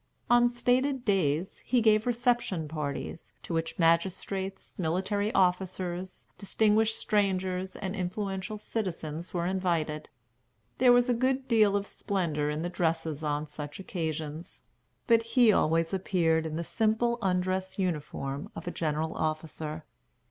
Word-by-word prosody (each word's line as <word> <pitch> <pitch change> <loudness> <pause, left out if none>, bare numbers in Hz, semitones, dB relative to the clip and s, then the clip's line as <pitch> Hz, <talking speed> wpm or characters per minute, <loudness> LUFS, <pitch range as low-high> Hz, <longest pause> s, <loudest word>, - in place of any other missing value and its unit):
On 240 0 +6
stated 250 +2 +1
days, 180 -4 +1
he 250 - +2
gave 220 0 +4
reception 240 -8 +1
parties, 145 -5 -5
to - - -5
which 165 0 -2
magistrates, 190 +4 0
military 190 +5 0
officers, 185 0 0
distinguished 220 +2 +2
strangers, 190 -2 0
and 190 -1 -4
influential 195 +2 -3
citizens 170 -7 -4
were 170 -1 -1
invited. 170 -5 -1 0.7
There 255 -1 +7
was 245 0 +5
a 250 - +3
good 260 +2 0
deal 215 -4 +4
of 200 0 0
splendor 165 -9 -1
in 150 +2 -2
the - - -1
dresses 160 -3 -1
on 150 0 -1
such 150 +1 -8
occasions; 160 -5 -5 0.4
but 230 -1 +5
he 230 0 +4
always 165 +1 +2
appeared 165 -4 +1
in 155 0 -4
the 170 - -2
simple 225 +5 +1
undress 185 0 0
uniform 150 -6 -3
of - - -7
a 175 - -3
general 160 -1 -1
officer. 155 0 -3
185 Hz, 135 wpm, -29 LUFS, 160-215 Hz, 0.7 s, There